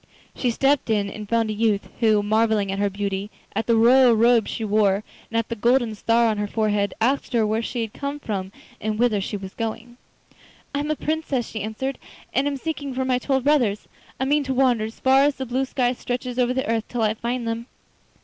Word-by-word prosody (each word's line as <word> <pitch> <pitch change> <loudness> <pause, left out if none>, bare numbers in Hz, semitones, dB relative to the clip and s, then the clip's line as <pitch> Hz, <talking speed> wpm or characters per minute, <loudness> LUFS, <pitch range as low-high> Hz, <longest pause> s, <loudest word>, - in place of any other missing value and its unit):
She 250 - 0
stepped 270 +3 +1
in 205 -2 +1
and 210 -1 -8
found 230 -2 +1
a - - -2
youth 210 -2 +1
who, 215 -3 +3
marvelling 215 -1 +2
at 195 - -3
her 205 0 +2
beauty, 200 0 -3 0.3
at 225 - -1
the 230 - +4
royal 245 +2 +6
robes 230 0 +4
she 225 - -3
wore, 205 -1 +2 0.3
and 230 - -2
at 230 - 0
the 230 - -2
golden 240 +1 +2
star 230 +2 +2
on 215 -2 +1
her 210 - -1
forehead, 210 -2 0
asked 260 +3 0
her 230 -2 +3
where 215 +1 0
she 230 0 -3
came 280 +6 -5
from 195 -7 -4 0.3
and 215 0 -2
whither 225 -3 +2
she 205 +1 -3
was 195 -1 -8
going. 230 +1 -5 0.8
'I 280 - 0
am 295 +1 -2
a 310 - +1
Princess,' 300 -6 -2
she 220 - -5
answered, 220 +6 -4 0.3
'and 275 - +2
am 285 -1 -1
seeking 285 -2 -4
for 260 0 -1
my 255 -1 +1
twelve 265 0 0
brothers. 245 -8 +2 0.3
I 265 - 0
mean 290 +2 +2
to 265 -1 -2
wander 250 -4 +3
as 220 - -9
far 265 +1 +5
as 285 0 +3
the 265 - -4
blue 255 +2 -1
sky 250 -2 0
stretches 250 0 -4
over 245 0 +3
the 260 - -1
earth 225 -1 0
till 240 -2 -2
I 215 0 +2
find 235 +2 -3
them. 230 +1 -3
230 Hz, 225 wpm, -23 LUFS, 215-260 Hz, 0.8 s, royal